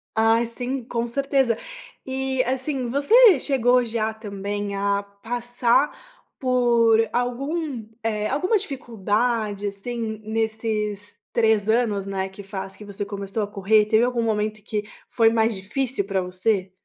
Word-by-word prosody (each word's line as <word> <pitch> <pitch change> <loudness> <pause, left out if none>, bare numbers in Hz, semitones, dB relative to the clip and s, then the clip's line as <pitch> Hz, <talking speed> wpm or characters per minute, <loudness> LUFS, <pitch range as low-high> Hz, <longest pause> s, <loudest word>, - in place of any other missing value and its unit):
Ai, 225 +1 +4
sim, 245 +3 -4
com 235 0 -2
certeza! 270 -2 +1 0.5
E, 265 0 -1
assim, 260 0 -2
você 400 - +6
chegou 250 -2 +3
já 220 -1 -1
também 205 -1 -4
a 200 0 0
passar 240 +6 0 0.5
por 240 -3 +4 0.2
algum 260 +1 -2 0.2
eh, 215 -1 -1
alguma 365 - +1
dificuldade, 225 - -1
assim, 220 +2 -4
nesses 220 -2 -2 0.2
3 220 -2 +2
anos, 220 -4 +1
né, 190 -1 -2
que 190 +1 -11
faz 195 0 -6
que - - -12
você 200 0 -5
começou 200 +1 -3
a - - -3
correr, 205 +1 +3
teve 220 +2 +3
algum 245 -1 +1
momento 215 -1 -1
que 210 -1 -2 0.3
foi 225 -2 +4
mais 225 0 +2
difícil 205 +3 -2
pra 195 -1 0
você? 185 +1 0
225 Hz, 135 wpm, -23 LUFS, 205-245 Hz, 0.5 s, você